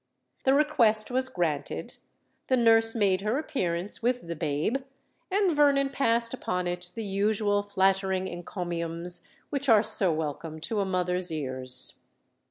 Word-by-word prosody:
The 265 0 +4
request 250 -8 +3
was 260 +1 +1
granted:—the 170 - -4
nurse 225 -1 +4
made 195 -4 +2
her 215 +5 -1
appearance 195 - -2
with 245 -3 -1
the 170 - -4
babe; 155 - -1 0.5
and 385 -4 +1
Vernon 280 -2 +3
passed 235 -3 +2
upon 180 0 -3
it 175 0 -4
the 225 - -4
usual 205 +1 0
flattering 190 -1 0
encomiums 175 -1 0 0.2
which 280 -1 -1
are 220 -2 +6
so 190 -4 +2
welcome 155 0 -4
to 215 +5 -2
a 200 - 0
mother's 180 -1 -1
ears. 130 -4 -2
200 Hz, 135 wpm, -27 LUFS, 175-235 Hz, 0.5 s, are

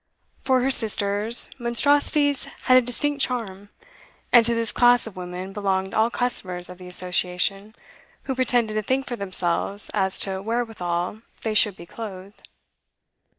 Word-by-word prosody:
For 260 -1 +2
her 265 +2 +2
sisters, 210 0 +2
monstrosities 285 +3 +2 0.2
had 255 - +5
a 255 - +7
distinct 280 +4 -1
charm, 205 -6 -3 0.6
and 240 -1 +8
to 235 +1 +1
this 230 -1 -1
class 245 0 +4
of 220 -3 -9
women 180 +1 -7
belonged 190 -2 -1
all 220 +1 +3
customers 185 -8 -2
of 180 - -12
the 180 - -10
Association 180 +3 -1 0.5
who 265 - -3
pretended 245 -4 +1
to 215 - 0
think 260 +5 -1
for 245 - -4
themselves 190 0 -1
as 190 -2 +1
to 190 -1 -1
wherewithal 210 -4 -3 0.2
they 220 - -1
should 210 -2 +3
be 170 - -11
clothed. 200 -1 -10
215 Hz, 150 wpm, -23 LUFS, 190-245 Hz, 0.6 s, and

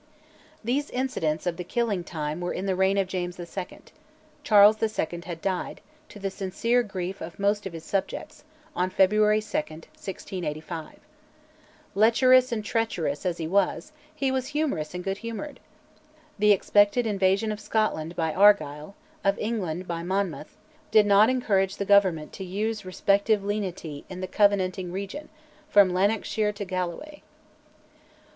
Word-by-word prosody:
These 270 +6 -1
incidents 165 -13 -2
of 175 -2 -1
"the 180 - -4
killing 205 -1 -1
time" 155 -1 -4
were 175 - -2
in 190 - -4
the 190 -1 0
reign 190 +1 +2
of 195 - +2
James 180 -1 -4
II.; 180 +2 -7 0.6
Charles 210 0 +6 0.2
II. 170 +2 -2
had 170 -2 -6
died, 190 -2 -2 0.3
to - - -12
the 195 -1 -3
sincere 230 +6 0
grief 195 -3 -5
of 165 +1 -8
most 200 0 0
of 185 - -9
his 165 -1 -8
subjects, 205 - -4 0.3
on 180 +1 0
February 210 +3 +3
2, - - -12
1685. 160 0 -5 1.0
"Lecherous 255 +5 +5
and 215 -3 -2
treacherous" 195 -9 -1
as 175 -1 -1
he 165 - -4
was, 200 - 0 0.2
he 275 -3 0
was 260 -1 -1
humorous 270 - -2
and 180 - -4
good 195 +1 -3
humoured. 230 +6 -6 0.8
The 210 0 +5
expected 205 +4 +3
invasion 200 0 +1
of 210 - -5
Scotland 210 -6 -1
by 160 -2 -1
Argyll, 170 -4 +3 0.3
of 195 0 +2
England 185 -6 -3
by 170 -1 -3
Monmouth, 175 -5 -3 0.3
did 215 -1 +5
not 205 +2 +6
encourage 200 -7 +1
the 200 - -3
Government 190 -6 +3
to 195 - -7
use 210 +4 -3
respective 200 +3 +1
lenity 185 -8 -4
in 185 -1 -7
the 185 - -3
Covenanting 185 -2 +1
region, 200 +11 -6 0.4
from 200 -6 +5
Lanarkshire 210 +2 +1
to 205 0 -6
Galloway. 185 - -4
195 Hz, 150 wpm, -26 LUFS, 180-215 Hz, 1.0 s, Charles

